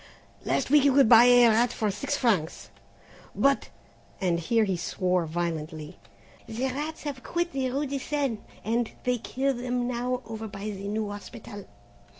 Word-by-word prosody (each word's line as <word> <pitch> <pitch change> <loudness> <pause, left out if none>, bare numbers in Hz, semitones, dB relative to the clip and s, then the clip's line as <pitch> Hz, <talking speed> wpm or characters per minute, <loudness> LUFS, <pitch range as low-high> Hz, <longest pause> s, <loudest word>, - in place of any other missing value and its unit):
"Last - - 0
week 295 -2 +6
you 280 -2 +4
could 275 -4 +6
buy 230 +1 +8
a 245 -1 +7
rat 230 +2 +3
for 215 -2 -1
six 280 +9 -2
francs, 195 - 0 0.6
but," 275 0 +2 0.5
and 175 -3 +1
here 225 +7 +2
he 195 -3 0
swore 180 0 -1
vilely, 160 -1 -4 0.5
"the 235 +4 -3
rats 300 +5 -5
have 285 -3 -5
quit 345 +4 -2
the 265 -1 -1
rue 275 +4 -1
de 275 0 -3
Seine 275 -5 -2 0.2
and 230 +1 0
they 250 -1 0
kill 270 +4 -1
them 245 0 -2
now 250 +1 -2
over 220 -1 -6
by 205 0 -6
the 200 0 -6
new 210 0 -2
hospital. 205 0 -9
235 Hz, 165 wpm, -27 LUFS, 200-265 Hz, 0.6 s, buy